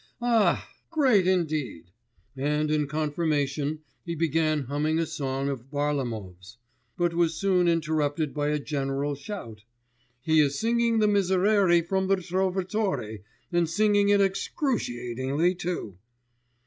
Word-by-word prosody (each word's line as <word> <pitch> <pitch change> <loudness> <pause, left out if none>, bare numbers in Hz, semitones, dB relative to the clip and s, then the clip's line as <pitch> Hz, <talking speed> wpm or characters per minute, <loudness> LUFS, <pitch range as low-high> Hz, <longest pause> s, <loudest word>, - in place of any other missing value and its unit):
'Ah! 235 -3 +2 0.2
great 260 - +3
indeed!' 155 - -1 0.4
and 150 +3 0
in 150 -1 +1
confirmation 150 -1 -1 0.2
he 170 -1 -4
began 155 -2 +1
humming 145 +4 -1
a 165 - +1
song 135 -2 -3
of 135 -2 -5
Varlamov's, 115 -10 -3 0.4
but 175 -1 +1
was 165 -1 +1
soon 180 0 +2
interrupted 155 -2 0
by 145 -1 -1
a 150 0 +1
general 140 -1 -2
shout, 140 - -8 0.6
'He 160 +1 +3
is 140 -2 +2
singing 230 0 +2
the 215 -1 +3
Miserere 190 -2 +3
from 190 +2 -1
the 195 - +4
Trovatore, 185 - -2 0.3
and 170 -2 +1
singing 205 +2 +3
it 205 0 +4
excruciatingly 150 - -1
too. 170 - -5
155 Hz, 120 wpm, -26 LUFS, 140-190 Hz, 0.6 s, the